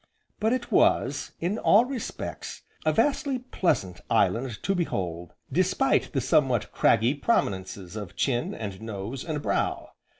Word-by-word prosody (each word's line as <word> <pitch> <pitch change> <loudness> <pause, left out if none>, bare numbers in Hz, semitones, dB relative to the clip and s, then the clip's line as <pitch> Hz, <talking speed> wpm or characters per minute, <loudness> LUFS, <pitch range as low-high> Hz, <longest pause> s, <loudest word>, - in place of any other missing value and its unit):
But 220 +2 +2
it 250 -1 -2
was, - - +2
in 185 +6 -1
all 220 +4 +5
respects, 255 -2 -6 0.2
a - - +6
vastly 280 -2 +1
pleasant 155 - -1
island 120 -2 +1
to 195 - +1
behold, 90 - -3 0.2
despite - - +2
the - - +1
somewhat 125 -8 +2
craggy 115 +3 +3
prominences 100 - -1
of 100 -5 -7
chin, 120 -3 0
and 100 -2 -6
nose, 110 +3 -5
and 155 -3 -3
brow. - - -1
125 Hz, 135 wpm, -27 LUFS, -, 0.2 s, a